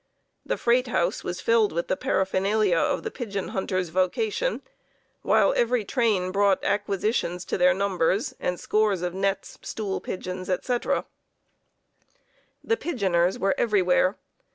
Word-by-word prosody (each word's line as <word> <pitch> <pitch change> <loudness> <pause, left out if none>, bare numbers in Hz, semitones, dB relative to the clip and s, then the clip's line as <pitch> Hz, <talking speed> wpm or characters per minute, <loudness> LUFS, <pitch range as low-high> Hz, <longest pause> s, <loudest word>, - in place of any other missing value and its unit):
The - - -2
freight 245 +2 +2
house 180 -5 0
was 180 +1 -4
filled 230 -1 +3
with 170 +2 -2
the - - +1
paraphernalia 190 +1 +1
of - - 0
the - - -4
pigeon 200 -6 -4
hunter's 185 -4 -2
vocation, 425 - 0 0.6
while - - +3
every 235 -2 +1
train 205 -6 +1
brought 200 0 +2
acquisitions 200 -3 -1
to - - -2
their 180 0 +5
numbers, 195 +1 0
and 180 -1 -2
scores 210 -4 +1
of 175 -1 -2
nets, 195 +1 -2
stool 205 -3 -4
pigeons, 185 0 -5
etc. 240 +6 0 1.6
The 455 - +1
pigeoners 190 - 0
were 195 0 +1
everywhere. 185 -3 +2
195 Hz, 130 wpm, -25 LUFS, 185-220 Hz, 1.6 s, their